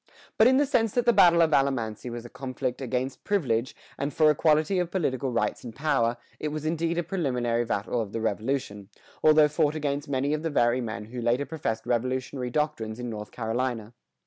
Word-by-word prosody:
But 220 - +6
in 260 +1 +5
the 290 - +4
sense 240 -6 +1
that 245 -1 +1
the 240 - +5
battle 170 -4 +6
of 160 -1 +1
Alamance 125 -7 0
was 120 0 -7
a - - -9
conflict 130 0 -4
against 130 +1 -3
privilege, 130 - 0 0.2
and 140 +1 -1
for 155 0 +4
equality 155 +5 +2
of 175 -2 -1
political 140 -8 -1
rights 120 - -1
and 115 -3 -8
power, 120 -6 +1 0.2
it 155 - -2
was 155 0 -4
indeed 165 +1 -1
a 175 - +1
preliminary 125 -9 -1
battle 115 +2 -1
of 105 -3 -5
the 115 - -3
Revolution, 110 -2 -2 0.3
although 155 -1 +6
fought 150 0 +1
against 145 -1 -2
many 140 +2 0
of 155 - -1
the 165 - -2
very 120 -3 +2
men 110 -3 -5
who 125 - -4
later 120 +4 +1
professed 115 -9 -3
Revolutionary 130 +1 -1
doctrines 120 -6 -2
in 120 -1 -4
North 105 -1 -6
Carolina. 115 -1 -3
130 Hz, 200 wpm, -27 LUFS, 120-155 Hz, 0.3 s, But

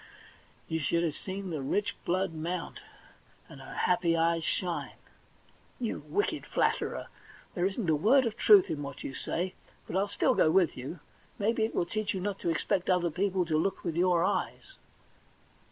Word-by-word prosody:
you 160 - -1
should 170 +3 +1
have 160 -4 -1
seen 190 -1 -5
the 155 -3 -3
rich 205 +10 -1
blood 185 0 0
mount, 165 +1 -4 0.7
and - - -12
her - - -9
happy 175 -2 +2
eyes 165 0 +2
shine! 175 +1 -2 0.5
* - - -32
You - - -3
wicked 410 +2 0
flatterer! - - 0 0.5
There 180 +1 +1
isn't 195 0 -3
a 160 - +4
word 245 - +4
of 225 - -2
truth 405 -3 +6
in 145 - -3
what 140 - -7
you 135 - -5
say, 180 +7 -3 0.3
but 195 +3 0
still - - +1
I'll - - +6
go - - +4
with 175 -1 +3
you. 140 +6 -7 0.4
Maybe 220 +2 +1
it 225 - -5
will - - +1
teach 215 +3 -2
you - - -2
not 195 +1 -3
to - - -1
expect 180 +3 0
other 175 -2 +2
people 185 +1 0
to 155 -2 +1
look 195 - -2
with 170 -3 -2
your 175 -1 +3
eyes.' - - -2
180 Hz, 185 wpm, -30 LUFS, 165-200 Hz, 0.7 s, truth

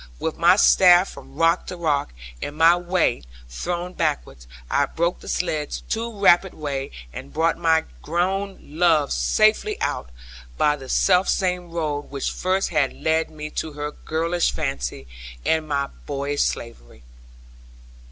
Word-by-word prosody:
With 160 - -3
my 175 +2 +6
staff 185 -2 +6
from - - -13
rock 165 +2 +2
to 180 - -6
rock, 150 - 0 0.3
and 145 - -5
my 165 +2 +6
weight 175 - 0 0.2
thrown 175 - -4
backward, 150 - -3 0.2
I 140 - +1
broke 170 +4 -1
the - - -13
sledd's 155 -4 -2
too 225 -1 -4
rapid 190 -1 +4
way, 140 -3 -4 0.2
and 135 - -8
brought 165 +2 +1
my 160 -1 +2 0.2
grown 190 +4 -1
love 155 -1 +2
safely 220 - +2
out, 60 - -2 0.5
by 150 0 +3
the 135 -3 -11
selfsame 180 -1 +2
road 150 -3 -3
which 140 -1 -3
first 190 +1 0
had 140 -3 +1
led 160 +1 0
me 150 -1 -8
to 160 - -4
her 150 0 -4
girlish 165 +3 -1
fancy, 135 - -4 0.4
and 160 -1 +1
my 140 -2 0 0.2
boyish 145 0 -2
slavery. 60 - -4
160 Hz, 140 wpm, -23 LUFS, 145-180 Hz, 0.5 s, my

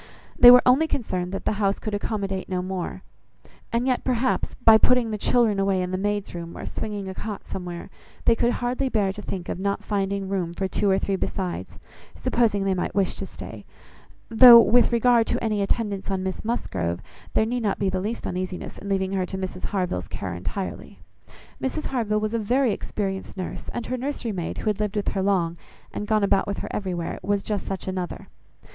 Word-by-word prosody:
They 245 - +10
were 250 0 +9
only 265 +6 +5
concerned 185 - -2
that 195 - -5
the - - +2
house 200 0 +2
could 215 - -5
accommodate 200 -2 -2
no 180 -1 -1
more; 185 -1 -4 0.7
and 235 +2 +1
yet 255 -1 +1
perhaps, 255 0 0
by 220 -1 +6
"putting 250 -2 +3
the 215 - -2
children 225 -4 +2
away 195 -1 +2
in 180 0 -2
the - - -1
maid's 205 0 -2
room, 170 -1 -7
or - - -6
swinging 205 -2 -4
a 190 - -5
cot 210 +1 -6
somewhere," 175 -2 -6 0.3
they - - +6
could 235 +1 +1
hardly 255 +2 -1
bear 205 -5 +1
to 210 - -8
think 185 -3 -5
of - - -4
not 200 +1 -1
finding 200 -1 -1
room 180 -3 -2
for 190 - -1
two 200 +1 0
or 190 - +4
three 195 0 -1
besides, 185 -1 -3 0.4
supposing 215 -5 +1
they 195 -1 +1
might 180 -1 -2
wish 195 -2 +2
to - - -6
stay; - - -9 0.6
though, 235 +1 +10
with 245 +1 +5
regard 235 -1 +4
to - - -1
any 215 -2 0
attendance 200 -1 -1
on 190 -1 -1
Miss 190 -1 -4
Musgrove, 90 - -2 0.4
there 220 - +4
need 245 +2 -2
not 205 -3 0
be 195 - 0
the 185 0 -1
least 220 +4 -4
uneasiness 185 0 -4
in 200 - -7
leaving 190 -1 0
her 190 -2 -1
to 190 - -5
Mrs 185 -1 -4
Harville's 180 - -2
care 95 -3 -5
entirely. 95 - -5 0.6
Mrs 285 +4 -2
Harville 220 -5 0
was 215 +1 -2
a 230 - +1
very 245 +2 +2
experienced 195 -2 -4
nurse, 185 - -5
and 240 - -4
her 255 - -2
nursery 255 -3 -3
maid, 175 -4 -4
who - - -6
had 210 - -6
lived 210 -1 -1
with 205 - 0
her 195 - -2
long, 175 -4 +1 0.3
and 210 - -4
gone 215 -1 +2
about 195 0 +2
with 200 - -2
her - - -5
everywhere, 180 -4 -3
was 200 +1 0
just 210 -3 -3
such 195 -1 -4
another. 185 -1 -4
200 Hz, 210 wpm, -24 LUFS, 190-225 Hz, 0.7 s, They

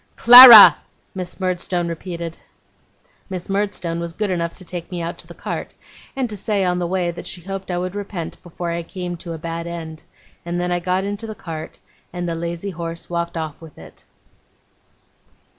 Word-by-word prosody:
'Clara!' 245 -3 +11 0.4
Miss 185 -1 -7
Murdstone 180 -1 -2
repeated. 170 0 -6 0.9
Miss 185 -2 -6
Murdstone 195 -4 -2
was 170 -1 -5
good 210 +1 -2
enough 170 -2 -2
to 185 - -13
take 175 -1 -7
me 180 - -5
out 170 0 -5
to - - -13
the - - -12
cart, - - -6 0.4
and 265 -2 -1
to 215 - -7
say 200 -1 -1
on 180 0 0
the 175 - -2
way 180 -1 -1
that 170 - -10
she 180 - -8
hoped 195 +2 -7
I 175 - -2
would 180 +1 -3
repent, 200 -5 -6
before 175 0 -6
I 170 0 -3
came 175 +1 -6
to 170 0 -8
a - - -6
bad 165 +1 -6
end; 160 -2 -7 0.4
and 175 +1 -4
then 180 0 -2
I 175 - 0
got 185 +2 -1
into 205 +3 -5
the 215 - -7
cart, 160 -4 -8 0.3
and 175 0 -5
the 170 - -2
lazy 170 +3 -5
horse 170 0 -7
walked 170 0 -3
off 160 -1 -6
with 160 -3 -14
it. 80 - -15
175 Hz, 190 wpm, -20 LUFS, 170-190 Hz, 0.9 s, Clara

